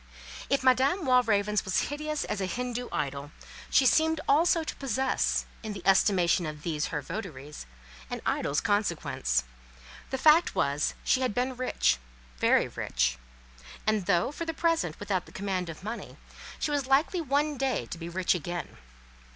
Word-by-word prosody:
If 275 -1 +1
Madame 265 +8 +3
Walravens 210 -5 +3
was 190 - 0
hideous 305 0 -2
as 205 - -3
a 190 - -1
Hindoo 245 +3 -3
idol, 140 0 -3 0.4
she 270 - +4
seemed 320 +4 +4
also 325 +3 +4
to - - -5
possess, 265 0 0 0.2
in 220 -2 -5
the 200 - -8
estimation 185 -3 +3
of 150 -1 -7
these 155 -3 -1
her 150 -2 -4
votaries, 150 - -7 0.4
an - - -4
idol's 145 - 0
consequence. 150 - 0 0.7
The 265 - -2
fact 310 +5 +5
was, 140 +2 0
she 260 - +2
had 255 -5 0
been 255 +1 0
rich—very - - 0
rich; - - -1 0.7
and 215 -4 +1
though, 180 +5 +2
for 335 +3 -5
the 325 -1 -3
present, 330 - 0
without 195 -3 -2
the - - -14
command 185 -3 -3
of 165 +2 -9
money, 220 +3 -6 0.4
she 300 - -2
was 285 -3 0
likely 295 +6 +2
one 295 +1 +1
day 270 -1 -1
to - - -7
be 165 0 -6
rich 180 +1 +1
again. 175 0 -5
210 Hz, 160 wpm, -28 LUFS, 165-270 Hz, 0.7 s, fact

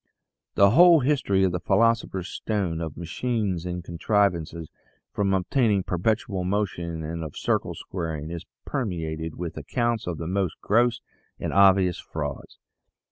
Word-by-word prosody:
The 100 0 +6
whole 170 +3 +7
history 125 -8 +2
of 95 - +3
the 90 - -2
philosopher's 100 -1 +1
stone, 95 -8 -2
of 80 -2 -5
machines 95 0 -2
and 90 0 -4
contrivances 85 -3 0 0.5
for - - -3
obtaining 100 +2 +2
perpetual 95 +1 -1
motion, 90 -4 -2
and 80 +1 -4
of 75 -2 -7
circle - - -1
squaring, 80 -4 -5
is 85 -1 -5 0.2
permeated 80 - -3
with 85 -2 -5
accounts 120 - -1
of 85 -3 -3
the 80 - -5
most 95 -1 -1
gross 120 +3 +2 0.4
and - - -3
obvious 95 -2 +5
frauds. 70 -3 -6
95 Hz, 135 wpm, -25 LUFS, 85-105 Hz, 0.5 s, whole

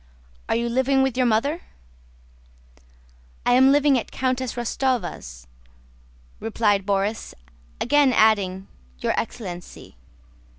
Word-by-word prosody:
"Are - - +2
you 235 +1 0
living 260 +3 +2
with 265 -2 -1
your 255 -1 +2
mother?" 280 +10 0 1.8
"I 245 - +3
am 265 +2 +6
living 285 -2 +4
at - - -8
Countess 255 -1 -2
Rostóva's," 220 - -3 0.9
replied 210 -3 0
Borís, 200 +2 -1 0.4
again 285 +1 +3
adding, 200 -5 +2 0.3
"your - - -1
excellency." 185 -7 -7
235 Hz, 100 wpm, -23 LUFS, 200-260 Hz, 1.8 s, am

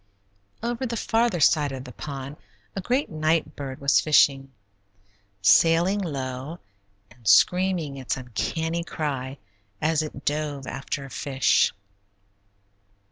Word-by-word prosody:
Over 240 +2 -2
the 235 0 -3
farther 225 -4 +1
side 145 -1 +4
of 130 -1 -6
the 125 - -10
pond 140 +1 -7 0.4
a 195 - -2
great 255 +9 0
night 155 +1 0
bird 135 -2 -6
was 140 0 +4
fishing, 135 -3 +3 0.9
sailing 165 - +5
low 135 -2 -4 0.5
and 120 -3 -14
screaming 180 - +3
its 130 0 -3
uncanny 160 +8 -2
cry 140 -5 -4 0.4
as 155 0 +1
it 150 -3 -7
dove 145 -2 -2
after 135 +1 -5
a 135 - -12
fish. 135 -2 +2
150 Hz, 120 wpm, -25 LUFS, 135-170 Hz, 0.9 s, sailing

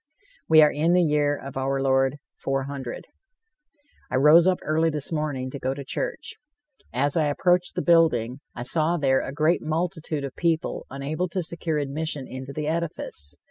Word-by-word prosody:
We 155 -1 +8
are 150 - +5
in 160 +4 +1
the 180 0 +4
year 150 -2 +2
of 135 -1 -8
our 135 +1 0
Lord, 135 +1 +2 0.2
400: 135 -2 -4 1.0
I - - -2
rose 150 +6 +6
up 185 -1 +3
early 160 +1 +2
this 150 -1 -3
morning 145 -5 -2
to 140 - -6
go 130 +1 -2
to 140 -1 -7
church. - - -4 0.5
As 140 +3 0
I 160 -2 +2
approached 180 +4 +2
the - - -1
building, 150 -8 +3 0.2
I 120 - -5
saw 160 +6 +1
there 135 -3 +2
a - - -5
great 155 +4 +2
multitude 160 -2 -2
of 135 -1 -6
people 165 -2 -1
unable 150 +6 -3
to 185 +1 -2
secure 165 -1 -3
admission 145 0 -3
into 130 +1 -7
the 150 +1 -4
edifice. 155 - -4
150 Hz, 175 wpm, -25 LUFS, 135-165 Hz, 1.0 s, We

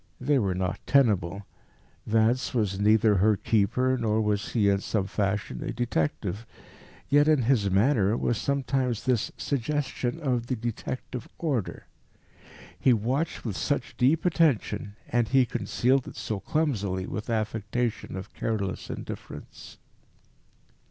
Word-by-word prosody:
They 145 -2 +2
were 95 -5 0
not 90 -1 -2
tenable: 100 -8 +2 0.6
Vance 115 +4 +2
was 100 -4 0
neither 105 0 +4
her 105 +2 +4
keeper, 125 +6 +1
nor 110 -2 +1
was 105 -2 -1
he 105 -4 +3
in 100 0 +3
some 100 -2 -1
fashion 100 - -2
a - - -3
detective. 105 -1 -2 0.6
Yet 145 +1 +4
in 150 -5 +4
his 115 -5 +2
manner 105 +1 +3
was 120 -2 0
sometimes 135 -4 -1
this 125 -4 +1
suggestion 140 -1 -2
of 125 -6 -1
the 130 - 0
detective 120 +1 -5
order. 135 - -2 0.9
He 130 - +5
watched 130 +10 -1
with 105 -5 -2
such 145 - -2
deep 145 +7 +2
attention, 120 - +1
and 120 -2 +1
he 130 +1 +4
concealed 130 +2 0
it - - -9
so 105 -3 -3
clumsily 105 -11 -1
with 105 +3 -5
an 115 - +2
affectation 110 +1 -2
of 95 - -7
careless 100 -4 -3
indifference. - - -8
115 Hz, 135 wpm, -27 LUFS, 105-130 Hz, 0.9 s, He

